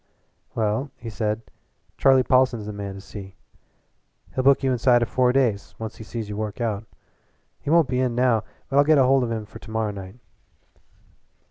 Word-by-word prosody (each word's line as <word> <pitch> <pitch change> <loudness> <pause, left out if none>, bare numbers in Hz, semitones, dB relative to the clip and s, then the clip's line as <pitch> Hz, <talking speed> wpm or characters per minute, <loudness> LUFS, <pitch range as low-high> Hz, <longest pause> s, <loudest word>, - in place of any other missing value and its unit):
"Well," 110 +5 0
he 115 -2 -7
said, 110 +1 -2 0.5
"Charlie 135 -1 +5
Paulson's 125 -4 +2
the 105 - -5
man 100 -1 -6
to 100 - -9
see. 95 -1 -10 1.0
He'll 130 - -1
book 140 +1 +5
you 135 - +2
inside 120 -1 +4
of 120 - -3
four 125 -1 +3
days, 120 -7 0
once 110 -1 -6
he - - -9
sees 110 0 -5
you 105 - -5
work 105 0 -4
out. 110 -2 -2 0.7
He - - -6
won't 165 -2 +5
be 125 -1 -1
in 125 -2 0
now, 120 -3 +2 0.2
but 140 - -1
I'll - - +7
get 155 +1 +4
hold 135 0 +4
of 120 - -2
him 110 -2 -3
for - - -12
to - - -13
morrow 110 -1 -1
night." 95 0 -9
115 Hz, 195 wpm, -24 LUFS, 105-130 Hz, 1.0 s, I'll